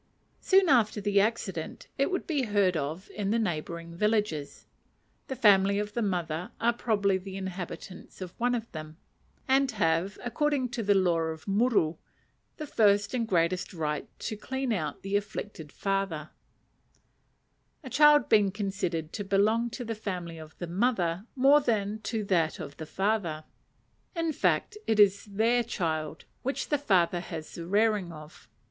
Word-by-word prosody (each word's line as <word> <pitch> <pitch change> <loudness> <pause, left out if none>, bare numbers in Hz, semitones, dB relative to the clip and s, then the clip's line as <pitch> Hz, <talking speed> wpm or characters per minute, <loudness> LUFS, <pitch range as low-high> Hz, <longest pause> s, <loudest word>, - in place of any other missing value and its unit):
Soon 385 -1 +4
after 230 -7 +3
the 205 0 +3
accident 200 -6 -3
it 275 - +1
would 370 - -2
be 300 -5 0
heard 200 -4 +2
of 155 +5 -4
in 205 -2 -3
the 225 - +2
neighbouring 170 -4 -3
villages; 210 -7 -1 0.6
the 265 - -4
family 200 -4 +5
of 210 0 -3
the 235 - -1
mother 175 -2 -2
are 235 +1 +2
probably 205 -5 +1
the 190 +1 -8
inhabitants 185 -1 -7
of 185 -2 -7
one 245 +1 +2
of 230 -1 -5
them, 155 0 -8 0.5
and 270 0 +3
have, 175 0 +1
according 275 +1 0
to 235 - -3
the 205 -1 +3
law 180 -3 +3
of 160 +1 -4
muru, 200 -6 +2 0.6
the 305 - -5
first 205 -6 +3
and 235 -3 0
greatest 180 0 0
right 150 -2 -2
to 215 - -4
clean 265 +3 -2
out 155 -7 -3
the 195 +1 -2
afflicted 205 -6 -4
father; 195 -6 -2 1.5
a 260 - -7
child 295 +2 +6
being 210 -2 +4
considered 190 -5 -3
to 205 - -3
belong 210 +4 +2
to 240 +1 -6
the 225 - -2
family 180 -6 -5
of 155 0 -12
the 175 - -4
mother 185 0 0
more 275 +3 +6
than 215 -4 0
to 215 0 -3
that 170 -5 +1
of 145 -2 -7
the 160 - -7
father 190 -6 -1 0.7
in 330 -2 0
fact, 425 +8 0
it 220 -1 +2
is 200 -1 +5
their 225 +4 +2
child, 160 -8 -3 0.2
which 270 +2 -3
the 295 - +1
father 180 -9 +2
has 160 -2 -7
the 170 0 -7
rearing 205 -2 +2
of. 155 -8 -12
200 Hz, 160 wpm, -28 LUFS, 170-230 Hz, 1.5 s, child